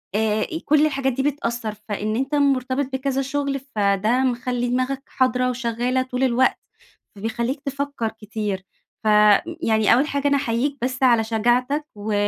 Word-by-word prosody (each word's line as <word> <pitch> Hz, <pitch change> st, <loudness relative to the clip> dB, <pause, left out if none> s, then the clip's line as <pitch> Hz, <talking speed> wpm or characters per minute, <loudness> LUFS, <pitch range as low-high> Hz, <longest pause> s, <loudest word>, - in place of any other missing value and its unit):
آآ 215 Hz, 0 st, +1 dB, 0.2 s
كل 300 Hz, +1 st, +4 dB
الحاجات 270 Hz, -3 st, 0 dB
دي 265 Hz, +2 st, -1 dB
بتأثّر، 235 Hz, -6 st, -2 dB, 0.2 s
فإن 215 Hz, +1 st, -2 dB
أنت 270 Hz, +4 st, -1 dB
مُرتبط 275 Hz, -1 st, +1 dB
بكذا 270 Hz, 0 st, -1 dB
شُغل 275 Hz, 0 st, -2 dB, 0.2 s
فده 205 Hz, +4 st, +2 dB
مخلّي 245 Hz, -1 st, -1 dB
دماغك 255 Hz, +2 st, -1 dB
حاضرة 255 Hz, -1 st, +1 dB
وشغّالة 245 Hz, +1 st, -1 dB
طول 255 Hz, 0 st, -3 dB
الوقت، 260 Hz, 0 st, +2 dB, 0.6 s
فبيخلّيك 235 Hz, +6 st, -3 dB
تفكّر 275 Hz, -4 st, -2 dB
كتير، 210 Hz, -2 st, -3 dB, 0.4 s
ف -, -, -2 dB
ي 210 Hz, +10 st, +4 dB
يعني 220 Hz, -3 st, +3 dB
أوّل 270 Hz, +5 st, +3 dB
حاجة 285 Hz, -1 st, -1 dB
أنا 285 Hz, 0 st, +3 dB
أحيّيك 265 Hz, +4 st, -1 dB
بس 255 Hz, +1 st, -2 dB
على 235 Hz, -3 st, +5 dB
شجاعتك 245 Hz, +6 st, +1 dB
و 210 Hz, +1 st, -4 dB
250 Hz, 150 wpm, -22 LUFS, 225-275 Hz, 0.6 s, على